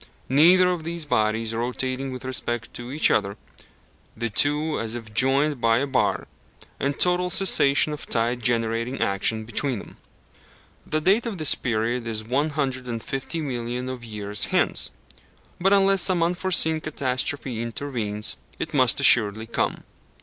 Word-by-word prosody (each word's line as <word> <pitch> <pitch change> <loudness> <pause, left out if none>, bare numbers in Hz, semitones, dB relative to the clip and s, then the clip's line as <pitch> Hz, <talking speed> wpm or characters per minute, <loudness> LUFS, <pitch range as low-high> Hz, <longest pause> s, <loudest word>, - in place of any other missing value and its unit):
Neither 175 +7 +5
of 175 -3 -4
these 170 -1 -5
bodies 110 -3 0
rotating 130 +3 -3
with 130 0 -8
respect 120 -3 -4
to 120 +1 -8
each 150 +3 +3
other 100 -1 0 0.8
the 115 0 -3
two 150 +6 +2
as 115 0 -3
if 110 -3 -9
joined 135 +3 +2
by 115 -1 +3
a 135 - 0
bar 135 -2 -1 0.5
and 140 +1 -2
total 180 0 +2
cessation 150 -6 +3
of 150 - -8
tide 120 +2 +1
generating 115 +2 0
action 110 +3 0
between 125 +2 -1
them. - - -12 0.9
The 155 0 -1
date 200 +8 +2
of 215 -4 -5
this 155 -3 +5
period 120 0 -2
is 110 -1 -2
one 135 +7 -1
hundred 135 -4 -3
and 115 -2 -5
fifty 135 +5 -4
millions 125 -2 -4
of 125 -2 -8
years 105 -2 -3
hence, - - +2 0.7
but 190 +2 +2
unless 195 -1 +4
some 175 -2 +3
unforeseen 170 -2 +1
catastrophe 130 -4 -3
intervenes, 115 -4 -2 0.2
it - - -5
must - - +3
assuredly 105 +2 +5
come. 115 - -2
130 Hz, 150 wpm, -23 LUFS, 115-155 Hz, 0.9 s, Neither